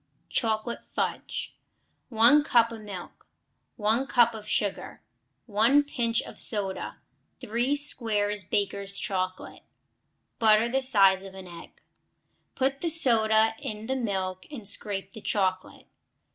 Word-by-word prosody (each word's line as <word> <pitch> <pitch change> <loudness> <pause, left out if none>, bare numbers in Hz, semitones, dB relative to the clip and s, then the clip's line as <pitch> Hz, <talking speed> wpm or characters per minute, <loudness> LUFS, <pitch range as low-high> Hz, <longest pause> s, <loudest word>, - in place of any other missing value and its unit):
Chocolate 225 0 -1
Fudge - - -4 0.5
1 240 +6 +5
cup 235 -4 +3
of 225 -1 -8
milk. 195 -4 -10 0.5
1 225 +4 +1
cup 235 -2 +4
of 215 -1 -9
sugar. 200 -2 -2 0.4
1 230 +7 +3
pinch 235 -4 -1
of - - -11
soda. 200 -3 0 0.4
3 240 +6 0
squares 210 -8 -1
Baker's 200 +1 -2
chocolate. 185 -2 -4 0.8
Butter 220 0 +5
the 265 +2 0
size 195 -7 +4
of 190 -1 -11
an 190 -1 -9
egg. 170 -1 -13 0.7
Put 270 +1 -1
the 340 - 0
soda 225 -7 +4
in 215 0 -6
the 265 +3 -2
milk 190 -6 -3
and 240 -9 -9
scrape 195 -1 -3
the 220 - -10
chocolate. 185 -3 -2
220 Hz, 125 wpm, -27 LUFS, 200-240 Hz, 0.8 s, 1